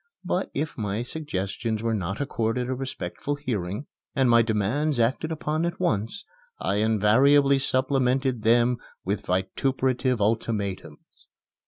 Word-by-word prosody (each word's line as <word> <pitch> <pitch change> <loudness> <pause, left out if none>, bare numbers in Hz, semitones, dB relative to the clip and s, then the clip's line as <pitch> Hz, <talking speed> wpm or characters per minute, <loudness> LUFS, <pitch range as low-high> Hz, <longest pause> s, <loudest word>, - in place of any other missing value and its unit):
But, 180 +2 -1
if 150 -1 -3
my 105 +2 -1
suggestions 110 - -3
were 115 -1 +1
not 95 -1 -2
accorded 125 -3 -1
a 130 - -1
respectful 130 0 -4
hearing, 110 -4 -3 0.3
and 130 -3 +3
my 115 0 +7
demands 115 +7 0
acted 130 +7 +1
upon 155 0 -1
at 170 0 -2
once, 145 - -1 0.3
I 100 - 0
invariably 130 +7 +4
supplemented 130 -1 +1
them 120 +2 +4 0.3
with 100 +2 -2
vituperative 130 +7 0
ultimatums. 100 -6 -3
120 Hz, 125 wpm, -26 LUFS, 105-135 Hz, 0.3 s, my